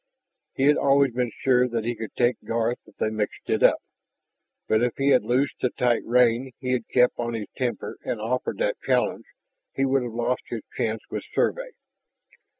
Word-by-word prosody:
He 135 - 0
had 145 +2 +5
always 140 -2 +3
been 125 0 0
sure 125 -1 +4
that 115 -2 -2
he 120 - 0
could 110 -1 -8
take 120 0 +2
Garth 115 +1 -1
if - - -19
they 110 - -1
mixed 110 -1 -3
it - - +1
up. - - +4 0.8
But 110 - +2
if 120 -1 +1
he 140 +1 +2
had 130 -2 +5
loosed 130 +3 0
the 125 - +2
tight 120 -2 +1
rein 125 +1 +3
he 125 -2 -3
had 125 -3 -1
kept 125 -1 +3
on 120 -1 -2
his 110 -2 -4
temper 125 -2 -3
and 115 - -3
offered 120 +4 -2
that - - -1
challenge, - - 0 0.5
he 135 - +1
would 135 0 +2
have 120 -2 -5
lost 120 +2 -1
his 115 -3 -5
chance 110 -1 -1
with - - -3
Survey. - - 0
125 Hz, 195 wpm, -25 LUFS, 115-130 Hz, 0.8 s, had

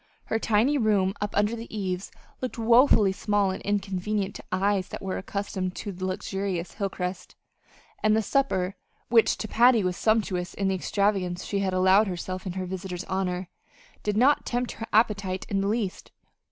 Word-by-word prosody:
Her 225 - -1
tiny 230 +7 +2
room 200 -4 +2
up 205 -1 -2
under 210 +3 +2
the 230 0 -7
eaves 190 -3 -3 0.3
looked 255 -1 -4
woefully 230 -3 +5
small 205 0 +1
and 190 - -5
inconvenient 200 0 -1
to - - -9
eyes 190 0 +1
that - - -7
were 190 -1 -2
accustomed 190 -1 -3
to 200 - -5
luxurious 185 0 -3
Hilcrest; 185 -3 -4 0.7
and 215 0 +4
the 220 - +2
supper 195 -7 0 0.3
which 230 -2 +4
to 215 - -4
Patty 235 0 +5
was 180 -1 0
sumptuous 195 -5 0
in 195 -1 0
the - - +1
extravagance 190 -1 0
she 200 - -1
had 190 -1 0
allowed 190 +3 +5
herself 185 +1 -4
in 180 - -3
her 185 0 -3
visitor's 185 -1 -5
honor 185 -1 -2 0.5
did 210 0 -1
not 270 +5 +4
tempt 245 0 -2
her 225 - -7
appetite 200 -4 +1
in 195 -1 0
the 195 - 0
least. 205 -3 -2
195 Hz, 170 wpm, -26 LUFS, 185-215 Hz, 0.7 s, woefully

